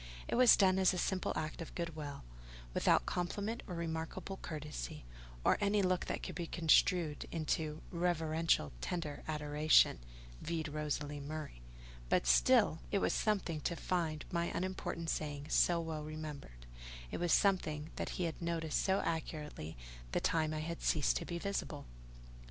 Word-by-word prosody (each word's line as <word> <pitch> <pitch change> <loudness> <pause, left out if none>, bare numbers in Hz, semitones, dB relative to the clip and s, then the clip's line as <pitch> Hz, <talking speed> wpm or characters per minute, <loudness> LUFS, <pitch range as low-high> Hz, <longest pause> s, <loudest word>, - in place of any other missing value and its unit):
It - - -3
was 250 0 +7
done 190 -1 +4
as 185 0 +4
a - - -2
simple 185 +1 0
act 155 +2 -3
of 165 - -8
goodwill, 155 - -5 0.5
without - - +3
compliment 205 +6 -2
or 180 - -5
remarkable 165 +3 -4
courtesy, 150 - -6 0.4
or - - +4
any 205 0 +3
look 185 -1 +1
that - - -3
could - - -4
be 170 -2 -4
construed 165 -1 +3
into 155 -1 -2
"reverential, 165 - +1
tender 165 -5 -3
adoration" 150 - +4 0.4
(vide 165 -1 -2
Rosalie 150 -1 -3
Murray); 145 - -6 0.5
but - - +3
still, - - +5
it - - +3
was - - +1
something 190 -7 0
to 170 - -1
find 165 -3 -1
my 170 -1 +1
unimportant 175 -3 -2
saying 145 -2 -3
so 170 +1 +4
well 160 -2 -4
remembered: 150 - -7 0.5
it - - -2
was 175 -1 +1
something 160 -6 +2
that - - -2
he 185 - 0
had 165 -1 -3
noticed 165 -2 0
so 190 0 +2
accurately 150 - -4 0.4
the - - +2
time 155 -2 +1
I 155 0 -2
had 170 +2 -4
ceased 150 -4 +2
to - - -4
be 170 - -4
visible. 170 -6 -3
160 Hz, 155 wpm, -35 LUFS, 150-175 Hz, 0.5 s, was